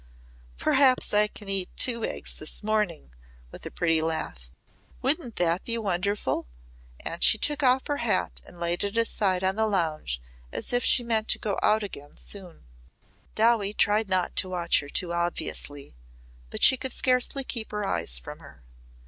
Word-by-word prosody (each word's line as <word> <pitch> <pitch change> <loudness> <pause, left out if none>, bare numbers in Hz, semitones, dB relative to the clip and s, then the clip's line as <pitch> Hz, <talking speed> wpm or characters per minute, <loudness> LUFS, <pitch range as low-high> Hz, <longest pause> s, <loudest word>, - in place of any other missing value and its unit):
"Perhaps 260 - +3
I 210 0 +5
can 210 -1 -13
eat 195 -2 -1
two 235 -3 +4
eggs - - -4
this 155 - -2
morning," 205 - -1 0.4
with - - -9
a - - -5
pretty 165 -2 +1
laugh. 160 - -3 0.5
"Wouldn't 265 -3 0
that 175 0 +1
be 230 -1 -2
wonderful?" 195 - -1 0.5
and 170 - -3
she 220 - +6
took 295 +6 0
off 260 -1 +3
her 290 - -1
hat 235 -5 -1
and 175 - -15
laid 170 +2 0
it 200 +2 -3
aside 200 -5 +1
on 190 +2 +1
the 220 0 +2
lounge 160 - -1 0.3
as - - -2
if 245 - +2
she 245 - +4
meant 225 -2 0
to - - +3
go 205 -3 -2
out 215 0 +3
again 145 -8 -9
soon. 185 - -9 0.7
Dowie 215 -2 +3
tried 210 0 +2
not 185 -1 0
to 185 - +2
watch 175 -2 +2
her 145 - -8
too 170 +3 -1
obviously, 170 -4 -3 0.6
but - - -5
she 260 - +7
could 260 0 -5
scarcely 255 +2 +2
keep 230 -4 -4
her 210 -1 -3
eyes 80 - +1
from - - -9
her. - - -16
200 Hz, 175 wpm, -26 LUFS, 170-230 Hz, 0.7 s, she